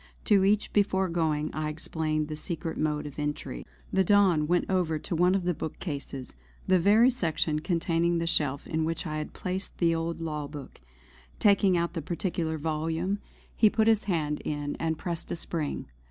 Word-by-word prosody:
To 200 -4 +5
each 205 +2 +2
before 190 -2 +2
going 155 -3 0
I 155 0 -2
explained 155 0 -1
the 155 - -4
secret 165 +1 -4
mode 150 -1 -1
of 145 0 -7
entry. 145 - -4 0.3
The 190 - +4
Don 185 -6 +4
went 175 +1 +2
over 180 -4 +1
to 160 - -4
one 180 +3 +4
of 195 - 0
the 180 0 +1
book 155 - -5
cases 140 - -6 0.3
the 185 -1 +4
very 215 +8 +5
section 160 -8 0
containing 170 0 +1
the 165 - -1
shelf 145 -4 0
in 160 0 -1
which 165 +2 -2
I 155 -2 -2
had 150 - -3
replaced 185 +1 -5
the 170 -1 +3
old 165 +1 -2
law 150 -3 -3
book. 140 - -10 0.6
Taking 200 -3 +4
out 170 0 0
that 165 - -3
particular 165 0 -2
volume, 160 +5 -1 0.4
he 215 - +6
put 220 +1 +2
his 220 -2 +3
hand 155 -6 -1
in 145 -1 -3
and 160 -1 -1
pressed 170 -2 -4
a - - 0
spring. 160 -3 -3
165 Hz, 185 wpm, -28 LUFS, 155-185 Hz, 0.6 s, he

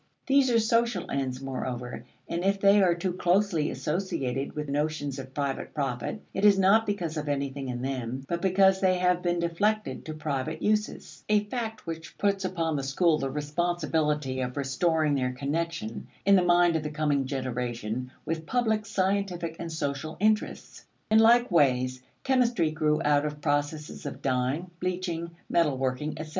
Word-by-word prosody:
These 275 -1 +4
are 235 - +4
social 230 -3 +1
ends, 130 -2 -2
moreover, 125 -2 -5 0.2
and 170 +1 -2
if 195 +1 +2
they 200 +1 +5
are 175 -3 +4
too 180 +1 -2
closely 180 -3 +2
associated 135 -3 -2
with 150 0 -3
notions 145 -1 -2
of 130 0 -9
private 140 0 -3
profit, 140 - -3
it 195 - -2
is 205 -2 +7
not 200 +4 +4
because 175 -6 -2
of 150 -1 -3
anything 140 -1 -2
in 125 0 -4
them, 130 0 -3
but 170 0 -2
because 190 0 +4
they 185 -1 +3
have 180 0 +2
been 175 -1 0
deflected 200 +6 -1
to 155 - -5
private 140 -4 -3
uses: 210 0 -1
a 210 -1 +4
fact 220 0 -5
which 165 -1 -7
puts 200 -1 +1
upon 165 -4 -1
the 135 - -2
school 155 +4 +2
the 135 - -2
responsibility 150 -2 -1
of 125 +1 -4
restoring 155 +3 +1
their 130 -2 0
connection, 145 -3 -3 0.2
in 200 0 +6
the 185 - +5
mind 175 -1 +4
of 160 - +1
the 150 - -4
coming 150 -3 0
generation, 125 -2 -3
with 160 0 -3
public 220 -3 +1
scientific 185 -4 -1
and 165 -1 -5
social 155 0 -3
interests. 215 +1 0 0.3
In 220 - +7
like 235 +1 +5
ways, 130 -5 +2 0.2
chemistry 240 - +2
grew 155 -1 +1
out 145 -1 +4
of 150 -1 -4
processes 145 0 -2
of 140 - -7
dying, 135 +7 -1
bleaching, 180 -2 -2 0.2
metal 150 -6 +2
working, 130 +3 -1
etc. 155 0 -6
160 Hz, 170 wpm, -28 LUFS, 140-190 Hz, 0.3 s, is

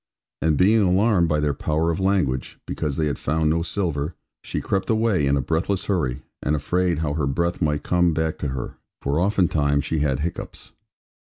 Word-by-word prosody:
And 80 -2 +2
being 105 +4 +5
alarmed 95 -1 +3
by 75 -1 +2
their 75 -1 +1
power 80 +4 0
of 80 - -3
language 95 -10 0
(because 70 -3 -3
they 80 - +1
had 70 -4 -2
found 80 +2 +1
no 85 +1 +1
silver), 85 -4 -2 0.3
she - - -3
crept 95 -1 -2
away 110 -9 +2
in 70 +1 +3
a - - +1
breathless 90 +7 -1
hurry, 75 -11 -1 0.2
and 75 - +1
afraid 90 +3 0
how 75 - -1
her 75 -2 0
breath 85 +7 -1
might 75 -2 0
come 90 -1 +2
back 80 0 -1
to 75 - -2
her. 65 -2 -5 0.3
For 70 +3 0
oftentime 85 -7 +2
she 80 - -1
had 70 -2 0
hiccoughs. 85 +2 -5
80 Hz, 190 wpm, -23 LUFS, 75-90 Hz, 0.3 s, being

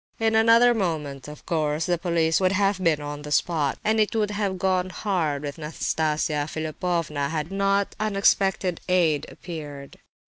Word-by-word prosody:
In 225 0 +1
another 230 +2 +5
moment, 155 - -3
of 150 0 -11
course, 155 -2 0
the 175 -2 0
police 165 -1 +1
would 185 0 +3
have 195 -1 +1
been 160 -4 +2
on 145 0 -6
the 150 0 -8
spot, 150 -3 +1
and 220 +1 +2
it 215 +1 +1
would 210 -2 +1
have 205 -2 -2
gone 185 0 0
hard 170 -7 -1
with 145 +1 -6
Nastasia 155 -1 -1
Philipovna 155 -2 -2
had 160 +2 -3
not 200 0 0
unexpected 195 -3 +1
aid 165 -5 +2
appeared. 145 -5 -9
170 Hz, 160 wpm, -24 LUFS, 150-195 Hz, -, another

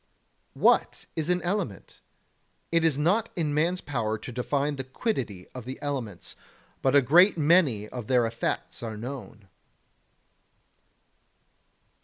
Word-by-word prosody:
42. - - -14
What - - +3
is 160 0 -2
an 180 0 +1
element? 175 - -3 0.7
It 165 -1 +3
is 160 -4 +3
not 195 +10 +2
in 155 -5 -1
man's 170 +5 +1
power 115 -6 -2
to 125 - -8
define 140 +4 -1
the 135 - -3
quiddity 130 - -3
of 125 - -7
the 130 +1 -6
elements, 125 -11 -5 0.5
but 135 +1 +2
a 140 - +6
great 175 - +6
many 145 - +3
of 120 -3 -7
their 125 -2 +3
effects 115 0 -3
are 110 -2 -5
known. 115 -4 -8
140 Hz, 135 wpm, -27 LUFS, 115-165 Hz, 0.7 s, a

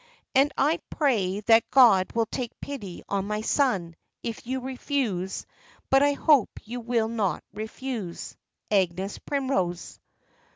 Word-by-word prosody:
And 275 +2 +4
I 310 +5 +2
pray 210 - +1
that 225 +1 +4
God 225 -9 +6
will 230 -1 +2
take 240 +1 -5
pity 210 -11 -7
on 200 0 -1
my 210 0 -2
son, 200 - +1 0.3
if 230 0 -5
you 260 +1 -1
refuse; 250 -7 -2 0.5
but 270 0 +6
I 285 0 +4
hope 285 -4 +4
you 240 +3 -6
will 235 -1 0
not 220 -5 -1
refuse. 220 -3 -5 0.4
"AGNES 190 0 0
PRIMROSE." 255 -12 -2
230 Hz, 130 wpm, -26 LUFS, 195-265 Hz, 0.5 s, God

